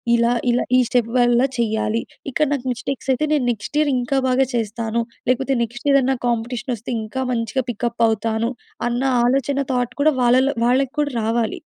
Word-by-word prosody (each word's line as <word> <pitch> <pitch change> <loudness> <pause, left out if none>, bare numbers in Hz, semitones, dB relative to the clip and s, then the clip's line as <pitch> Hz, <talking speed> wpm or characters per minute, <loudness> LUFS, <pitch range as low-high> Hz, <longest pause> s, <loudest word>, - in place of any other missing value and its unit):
ఇలా, 235 +1 +3 0.2
ఇలా 240 +1 +2
ఈ - - +6
స్టెప్ 240 -2 +1
వల్ల 240 -1 +4 0.2
చెయ్యాలి. 220 -1 0 0.3
ఇక్కడ 300 +3 +1
నాకు 265 -3 -3
మిస్టేక్స్ 270 +2 -5
అయితే, 260 +4 0
నేను 280 -4 +1
నెక్స్ట్ 230 +6 -5
ఇయర్ 300 -2 +2
ఇంకా 250 +3 -1
బాగా 260 +1 +3
చేస్తాను. 230 0 -1 0.3
లేకపోతే, 265 +2 +1
నెక్స్ట్ 240 +5 -6
ఇయరన్నా 270 -1 +3
కాంపిటీషనొస్తే, 240 0 -3
ఇంకా 260 +5 -4
మంచిగ 230 +1 -1
పికప్ 235 +1 -2
అవుతాను. 220 +2 -1 0.4
అన్న 240 +1 -1 0.2
ఆలోచన, 275 +2 +1
థాట్ 245 -1 -1
కూడా 310 +1 +4
వాళ్ళల్లో 255 +3 +4
-వాళ్ళకి 255 +2 +2
కూడా 290 -2 0
రావాలి. 230 +10 -1
245 Hz, 165 wpm, -21 LUFS, 230-265 Hz, 0.4 s, ఈ